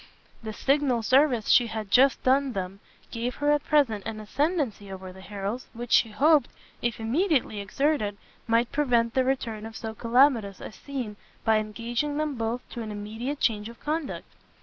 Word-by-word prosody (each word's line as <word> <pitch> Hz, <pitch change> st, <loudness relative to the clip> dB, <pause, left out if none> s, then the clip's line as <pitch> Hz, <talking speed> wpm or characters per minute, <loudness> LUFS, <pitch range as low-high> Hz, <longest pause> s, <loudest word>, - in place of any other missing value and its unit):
The 220 Hz, -1 st, -5 dB
signal 265 Hz, 0 st, +1 dB
service 255 Hz, -2 st, +3 dB
she 240 Hz, -, +6 dB
had 220 Hz, -3 st, -5 dB
just 265 Hz, +2 st, +5 dB
done 265 Hz, 0 st, +3 dB
them 190 Hz, 0 st, -4 dB, 0.3 s
gave 235 Hz, +1 st, -3 dB
her 290 Hz, 0 st, +1 dB
at 295 Hz, -1 st, +2 dB
present 245 Hz, -9 st, +2 dB
an 215 Hz, -, -5 dB
ascendency 255 Hz, -, -1 dB
over 185 Hz, -1 st, -8 dB
the 190 Hz, -, -13 dB
Harrels, 205 Hz, +5 st, -5 dB
which 240 Hz, 0 st, -7 dB
she 225 Hz, -, +5 dB
hoped, 285 Hz, +4 st, +4 dB, 0.3 s
if 235 Hz, -2 st, -1 dB
immediately 260 Hz, -, +1 dB
exerted, 210 Hz, 0 st, 0 dB, 0.3 s
might 230 Hz, +1 st, +2 dB
prevent 240 Hz, -5 st, +2 dB
the 260 Hz, -, +3 dB
return 240 Hz, -5 st, -2 dB
of 225 Hz, 0 st, -8 dB
so 220 Hz, -1 st, -5 dB
calamitous 230 Hz, -4 st, +3 dB
a -, -, -8 dB
scene, 245 Hz, -4 st, -6 dB, 0.3 s
by 220 Hz, -1 st, +4 dB
engaging 235 Hz, +7 st, -3 dB
them 305 Hz, -1 st, -1 dB
both 230 Hz, 0 st, -3 dB
to 240 Hz, -, -5 dB
an 220 Hz, -, -5 dB
immediate 220 Hz, +7 st, -5 dB
change 215 Hz, -1 st, 0 dB
of 235 Hz, -, -13 dB
conduct. 305 Hz, -1 st, -3 dB
235 Hz, 170 wpm, -27 LUFS, 215-275 Hz, 0.3 s, she